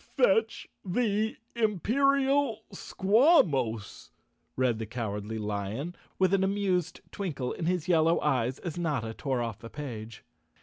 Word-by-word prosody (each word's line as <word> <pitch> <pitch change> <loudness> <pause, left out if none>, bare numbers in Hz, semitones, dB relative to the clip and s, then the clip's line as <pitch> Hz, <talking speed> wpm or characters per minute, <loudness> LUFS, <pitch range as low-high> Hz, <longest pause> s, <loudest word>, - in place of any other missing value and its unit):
"Fetch - - +2 0.2
the 215 +2 0 0.2
Imperial 265 - +2
Squawmos," 185 - +2 0.5
read 125 -3 +1
the 110 - -4
Cowardly 110 -2 -4
Lion, 105 - -3 0.2
with 185 0 +2
an 195 -1 +3
amused 195 -3 0
twinkle 145 -11 -3
in 165 - -3
his 180 -1 0
yellow 165 -1 +4
eyes 130 -3 +1
as 175 -1 -6
Notta 140 -10 -1
tore 130 -1 -2
off 115 -3 -5
the 115 - -9
page. 115 -7 -7
165 Hz, 125 wpm, -29 LUFS, -, 0.5 s, yellow